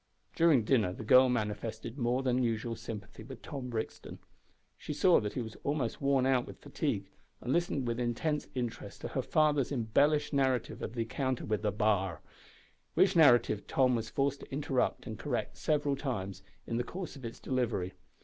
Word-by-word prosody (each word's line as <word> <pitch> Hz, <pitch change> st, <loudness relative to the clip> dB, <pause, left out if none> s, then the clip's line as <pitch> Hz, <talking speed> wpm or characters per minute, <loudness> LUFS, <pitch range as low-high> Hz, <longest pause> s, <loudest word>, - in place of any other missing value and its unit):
During 160 Hz, -8 st, +5 dB
dinner 110 Hz, -5 st, +2 dB
the 110 Hz, -, -7 dB
girl 130 Hz, +4 st, +6 dB
manifested 110 Hz, 0 st, -3 dB
more 125 Hz, +2 st, +1 dB
than 130 Hz, -1 st, +2 dB
usual 115 Hz, -1 st, -1 dB
sympathy 110 Hz, -2 st, -8 dB
with 135 Hz, -, -10 dB
Tom 135 Hz, -5 st, -6 dB
Brixton. 110 Hz, -2 st, -5 dB, 0.6 s
She -, -, -6 dB
saw 180 Hz, +4 st, +5 dB
that 105 Hz, -1 st, -3 dB
he 125 Hz, -, -2 dB
was 110 Hz, -1 st, -9 dB
almost 140 Hz, -4 st, -1 dB
worn 140 Hz, -2 st, +3 dB
out 130 Hz, -2 st, +2 dB
with -, -, -9 dB
fatigue, -, -, -2 dB, 0.3 s
and 125 Hz, -, -2 dB
listened 170 Hz, -6 st, 0 dB
with 120 Hz, 0 st, -1 dB
intense 125 Hz, +6 st, -1 dB
interest 120 Hz, -2 st, -4 dB
to -, -, -4 dB
her -, -, -1 dB
father's 150 Hz, -4 st, +2 dB
embellished 145 Hz, +5 st, +2 dB
narrative 130 Hz, -3 st, +1 dB
of -, -, -4 dB
the 115 Hz, -, 0 dB
encounter 130 Hz, +2 st, -2 dB
with 105 Hz, 0 st, -1 dB
the 105 Hz, -1 st, +1 dB
"b'ar," 100 Hz, -5 st, +1 dB, 0.7 s
which 190 Hz, 0 st, +4 dB
narrative 120 Hz, -9 st, +5 dB
Tom 130 Hz, -2 st, +3 dB
was 110 Hz, -1 st, -3 dB
forced 140 Hz, +3 st, 0 dB
to -, -, -12 dB
interrupt 135 Hz, -2 st, 0 dB
and 110 Hz, -3 st, -6 dB
correct 130 Hz, -5 st, -2 dB
several 145 Hz, -2 st, +1 dB
times, 100 Hz, -9 st, -4 dB, 0.2 s
in 115 Hz, -, -2 dB
the 120 Hz, -, 0 dB
course 175 Hz, +5 st, -6 dB
of 135 Hz, -, -11 dB
its 115 Hz, -1 st, -6 dB
delivery. 115 Hz, -8 st, -1 dB
125 Hz, 180 wpm, -32 LUFS, 110-140 Hz, 0.7 s, girl